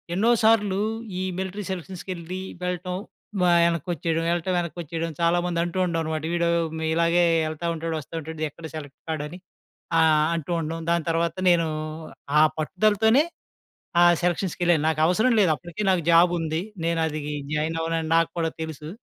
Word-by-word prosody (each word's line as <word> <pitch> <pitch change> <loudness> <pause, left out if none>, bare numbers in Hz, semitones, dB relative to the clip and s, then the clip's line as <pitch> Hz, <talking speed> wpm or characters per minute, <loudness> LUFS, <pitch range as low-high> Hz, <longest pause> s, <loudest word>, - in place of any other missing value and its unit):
ఎన్నో 215 +5 +3
సార్లు 210 -3 +4 0.4
ఈ - - -2 0.2
మిలిటరీ 190 +2 -4
సెలక్షన్స్‌కెళ్లి 185 -1 -5 0.2
వెళ్ళటం 180 0 -3 0.5
వా 180 - +4 0.2
యనకోచ్చేయడం. 170 -1 -1
వెళ్ళటం 175 +2 0
యెనక్కిచ్చేయడం 165 -1 -4
చాలా 170 +1 +3
మంది 175 -1 -1
అంటూ 175 +1 -4
ఉంటాం 170 -2 -1
అన్నమాట. 155 -1 -3
వీడు 170 0 +1 0.5
ఇలాగే 170 +1 +3 0.2
యెళ్తా 155 +2 -4
ఉంటాడు 165 0 -3
వస్తా 150 - -13
ఉంటాడు 160 0 -6
ఎక్కడ 165 +3 -12
సెలెక్ట్ 145 -3 -8
కాడు 155 -2 -2
అని 170 +4 -9 0.6
ఆహ్, 155 -1 +4
అంటూ 165 0 -4
ఉండటం. 165 +1 -4
దాని 170 -1 +1
తర్వాత 165 +1 0
నేను 170 -2 +3 0.7
ఆ - - +7 0.2
పట్టుదలతోనే 215 - +3 0.8
ఆ - - +8 0.2
సెలక్షన్స్‌కెళ్ళాను. 175 -2 +1
నాకవసరం 175 +10 +3
లేదు. 185 -6 +4
అప్పటికే 175 +5 -6
నాకు 180 -3 +1
జాబ్ 170 +1 +6
ఉంది. 160 0 -1 0.2
నేను 165 0 +1
అది 155 -1 -4 0.3
జాయిన్ 160 +2 -1
అవ్వనని 165 -1 -1
నాకు 165 0 +2
కూడా 165 -1 0
తెలుసు. 155 -1 -6
170 Hz, 150 wpm, -25 LUFS, 160-180 Hz, 0.8 s, ఆ